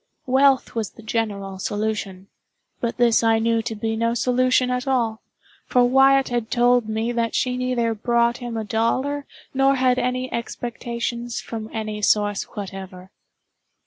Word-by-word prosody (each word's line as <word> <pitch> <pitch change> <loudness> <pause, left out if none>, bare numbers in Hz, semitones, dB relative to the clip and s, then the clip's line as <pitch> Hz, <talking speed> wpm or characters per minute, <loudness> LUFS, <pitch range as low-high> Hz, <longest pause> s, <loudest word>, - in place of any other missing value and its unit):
Wealth 270 0 +3
was 220 -5 -2
the 230 - -15
general 200 -4 -3
solution—but 205 +2 -5
this 235 -2 +4
I 225 0 +4
knew 230 0 +1
to 225 0 -4
be 225 +1 -2
no 230 +1 0
solution 255 +1 +2
at 250 +1 -2
all; 230 -4 0 0.5
for 250 -1 +4
Wyatt 270 +2 +4
had 240 -2 -2
told 245 -2 +3
me 220 +2 -1
that 235 -1 -1
she 250 -1 0
neither 250 -2 0
brought 235 +2 +1
him 240 -2 -5
a 220 - -2
dollar 260 +7 -1 0.3
nor 270 +1 +3
had 255 -1 +2
any 255 +1 -2
expectations 235 0 -4
from 220 -1 -6
any 215 -1 -4
source 205 -1 +2
whatever. 190 -2 -8
235 Hz, 145 wpm, -22 LUFS, 220-250 Hz, 0.5 s, this